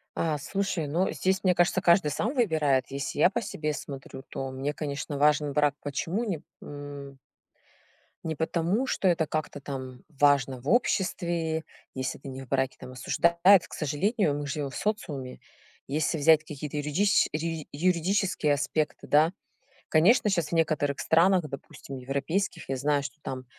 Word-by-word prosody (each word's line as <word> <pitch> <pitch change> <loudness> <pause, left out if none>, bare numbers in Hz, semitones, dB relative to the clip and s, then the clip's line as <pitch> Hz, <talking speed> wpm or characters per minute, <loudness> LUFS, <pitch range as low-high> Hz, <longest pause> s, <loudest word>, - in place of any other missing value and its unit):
Э, 160 -2 0
слушай, 190 0 -2
ну, 170 +6 +1
здесь, 190 0 0
мне 185 -2 +3
кажется, 175 +2 +2
каждый 170 -3 +4
сам 220 - -1
выбирает. 155 - +2
Если 140 +1 -4
я 175 - +6
по 235 - -2
себе 155 -7 -3
смотрю, 135 -2 -8
то 135 0 -4
мне, 135 +3 -3
конечно, 145 -1 -4
важен 150 0 +3
брак. 145 -1 +2
Почему 165 - -2
не 185 -10 -3 0.2
м. 145 -1 -8 1.1
Не 160 -1 -3
потому, 170 - 0
что 200 - 0
это 170 -3 +3
как-то 155 -1 -3
там 130 -3 -7
важно 140 -4 +2
в 140 - -4
обществе, 170 -8 +1 0.3
если 130 0 -3
ты - - -11
не 135 0 -7
в - - -14
браке, 135 0 0
там 125 - -9
осуждают, 170 +8 +4
к - - -14
сожалению, 155 - 0
мы 145 - -4
живем 145 0 -3
в 135 - -10
социуме. 150 -12 -3 0.5
Если 155 +3 0
взять 155 +1 +6
какие-то 150 -1 -6
юридич 150 +8 +2
юри 160 0 -3
юридические 180 0 +1
аспекты, 145 +2 -2
да, 155 +4 +4 0.6
конечно, 205 +8 +4
сейчас 170 -5 0
в - - -14
некоторых 155 -4 +1
странах, 175 0 +3
допустим, 140 0 -9
европейских, 150 +8 -2
я 135 - -1
знаю, 140 +1 +1
что 140 +1 -8
там 130 -1 -5
150 Hz, 160 wpm, -27 LUFS, 140-175 Hz, 1.1 s, я